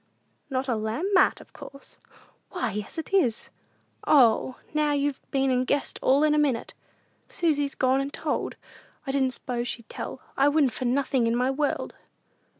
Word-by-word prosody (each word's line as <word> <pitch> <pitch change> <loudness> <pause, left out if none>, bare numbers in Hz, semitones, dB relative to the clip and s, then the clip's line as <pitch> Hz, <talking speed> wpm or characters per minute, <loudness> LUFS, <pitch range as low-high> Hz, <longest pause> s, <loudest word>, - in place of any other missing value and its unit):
"Not 265 0 -2
a 245 - +1
lamp 225 - -2
mat, 375 - +4
of - - -18
course?" 275 - -13 0.5
"Why, 360 - -2
yes 210 +6 -6
it 325 +4 -6
is! 255 - +1 0.6
O, 255 -2 +4 0.2
there, 305 0 +2
now 295 - +2
you've 285 -1 -1
been 270 -1 +1
and 255 0 +1
guessed 285 - -1
all 275 +3 +4
in 305 -1 +4
a 300 - +3
minute! 270 -6 0 0.6
Susy's 290 -5 0
gone 260 +1 +2
an' 275 - -3
told! - - -3 0.5
I 270 - -2
didn't 265 -2 +1
s'pose 240 -1 -4
she'd 235 -2 -5
tell. - - -6 0.2
I 275 - +4
wouldn't 290 -5 +2
for 255 - -4
nothin' 260 -1 +1
in 230 - +1
my 250 +2 +1
world!" 290 +1 -2
270 Hz, 175 wpm, -26 LUFS, 250-290 Hz, 0.6 s, mat